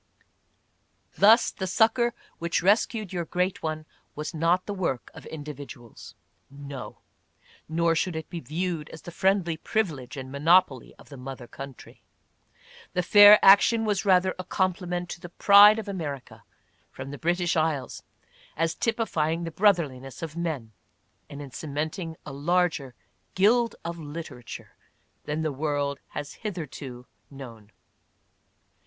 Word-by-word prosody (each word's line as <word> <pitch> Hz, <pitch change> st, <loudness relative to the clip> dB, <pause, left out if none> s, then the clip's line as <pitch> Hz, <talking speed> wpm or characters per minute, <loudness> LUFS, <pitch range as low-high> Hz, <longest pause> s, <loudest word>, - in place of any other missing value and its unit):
Thus 225 Hz, +4 st, +5 dB
the 190 Hz, -, -5 dB
succor 230 Hz, +4 st, +2 dB, 0.2 s
which 170 Hz, +1 st, -1 dB
rescued 210 Hz, 0 st, +1 dB
your 175 Hz, -1 st, -2 dB
great 180 Hz, +3 st, -1 dB
one 155 Hz, -1 st, -4 dB, 0.3 s
was 150 Hz, +3 st, -5 dB
not 170 Hz, +3 st, +1 dB
the 205 Hz, -, -4 dB
work 165 Hz, -10 st, -3 dB
of -, -, -12 dB
individuals, 145 Hz, -5 st, -10 dB, 0.3 s
no! 140 Hz, -1 st, -9 dB, 0.4 s
— -, -, -44 dB, 0.3 s
nor 165 Hz, +1 st, +2 dB
should 165 Hz, +1 st, -1 dB
it 160 Hz, -1 st, -5 dB
be 170 Hz, -, -6 dB
viewed 165 Hz, 0 st, -4 dB
as 160 Hz, -, -11 dB
the 175 Hz, -, -8 dB
friendly 185 Hz, -2 st, +1 dB
privilege 155 Hz, -, -3 dB
and 130 Hz, -1 st, -7 dB
monopoly 150 Hz, -2 st, +2 dB
of -, -, -18 dB
the 140 Hz, -, -10 dB
mother 130 Hz, -1 st, -8 dB
country 135 Hz, +1 st, -11 dB, 0.5 s
— -, -, -24 dB
the 180 Hz, -, +1 dB
fair 205 Hz, +3 st, +9 dB
action 220 Hz, +3 st, +6 dB
was 205 Hz, -2 st, 0 dB
rather 185 Hz, -2 st, +3 dB
a -, -, -3 dB
compliment 180 Hz, -1 st, -2 dB
to -, -, -6 dB
the 175 Hz, -, -10 dB
pride 205 Hz, +4 st, +7 dB
of 220 Hz, -, -5 dB
America 155 Hz, -9 st, -6 dB, 0.5 s
from 130 Hz, +1 st, -8 dB
the 145 Hz, -, -8 dB
British 175 Hz, +1 st, 0 dB
Isles 155 Hz, -5 st, -1 dB, 0.6 s
as 165 Hz, 0 st, +1 dB
typifying 170 Hz, -9 st, -1 dB
the 165 Hz, -, -5 dB
brotherliness 155 Hz, -9 st, 0 dB
of 160 Hz, -1 st, -6 dB
men, 155 Hz, -10 st, -4 dB, 0.6 s
and 140 Hz, +1 st, -8 dB
in 135 Hz, -, -11 dB
cementing 155 Hz, +4 st, -5 dB
a 140 Hz, -, -7 dB
larger 150 Hz, -3 st, 0 dB, 0.4 s
guild 230 Hz, +5 st, +3 dB
of 170 Hz, 0 st, -5 dB
literature 145 Hz, -5 st, -8 dB, 0.5 s
than 155 Hz, +2 st, -2 dB
the 155 Hz, -, -1 dB
world 145 Hz, -1 st, -2 dB
has 145 Hz, -1 st, -7 dB
hitherto 145 Hz, -, -6 dB, 0.2 s
known. 115 Hz, -7 st, -11 dB
165 Hz, 140 wpm, -26 LUFS, 145-185 Hz, 0.6 s, fair